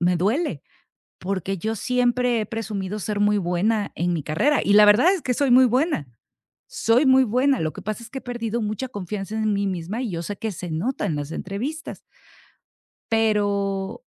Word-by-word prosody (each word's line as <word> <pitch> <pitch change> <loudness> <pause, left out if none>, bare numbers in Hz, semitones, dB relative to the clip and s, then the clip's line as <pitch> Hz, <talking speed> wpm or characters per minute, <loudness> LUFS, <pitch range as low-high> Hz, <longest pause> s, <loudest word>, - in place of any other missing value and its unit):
me 180 0 +2
duele, 205 - 0 0.6
porque, 195 +1 -3
yo 220 +5 -2
siempre 245 0 +1
he 215 - -3
presumido 210 -2 -4
ser 205 +1 -3
muy 205 0 +3
buena 200 +4 0
en 175 +1 0
mi 160 - -2
carrera 265 - +1
y 200 - +2
la 210 0 +8
verdad 240 - +6
es 360 - -5
que 250 - -1
soy 280 0 +1
muy 255 +1 +7
buena, 255 - 0 0.6
soy 235 +6 +2
muy 260 0 +6
buena, 255 +4 +2
lo 155 -1 -1
que - - -9
pasa 215 +3 -4
es 230 - -10
que 265 - -5
he - - -9
perdido 235 -2 -3
mucha 215 +5 -3
confianza 205 -1 -5
en 215 -1 +1
mí 200 0 0
misma, 185 +4 -3
y 240 - -3
yo 170 - -3
sé 205 +4 -5
que 220 -1 -3
se 175 -1 -7
nota 200 +12 -2
en 155 - -1
las 145 +1 -5
entrevistas. 255 - -5 1.1
Pero, 205 - 0
210 Hz, 195 wpm, -23 LUFS, 195-245 Hz, 1.1 s, la